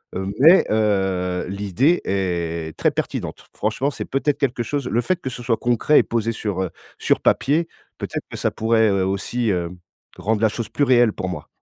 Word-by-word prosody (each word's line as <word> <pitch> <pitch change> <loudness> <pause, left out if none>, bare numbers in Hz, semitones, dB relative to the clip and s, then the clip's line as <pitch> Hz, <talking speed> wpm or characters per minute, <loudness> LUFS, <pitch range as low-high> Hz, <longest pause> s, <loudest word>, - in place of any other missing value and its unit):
heu, 95 - -2
mais, 165 +7 +7
heu, 95 -4 +1
l'idée 100 - +1
est 85 -4 -2
très - - +3
pertinente. - - -4
Franchement, 110 +7 -1
c'est - - -6
peut-être 140 +1 -1
quelque 125 -3 0
chose 140 +1 -3
le 120 - +1
fait 180 +8 -1
que 130 - -3
ce 125 -1 -8
soit 115 -1 +1
concret 120 +5 +3
et - - +3
posé 115 -1 -1
sur, 100 -4 -2
heu, 90 - -4 0.3
sur - - +1
papier 160 +5 +2 0.3
peut-être - - -4
que - - -6
ça - - 0
pourrait, 110 0 +2
heu, 100 -2 +1
aussi, 100 +5 -1
hem, 90 -2 -2 0.4
rendre 110 +1 -1
la 110 - +4
chose 115 +1 -5
plus 145 - 0
réelle 120 -4 +4
pour 95 - -4
moi. 85 -5 -6
110 Hz, 195 wpm, -22 LUFS, 95-125 Hz, 0.4 s, mais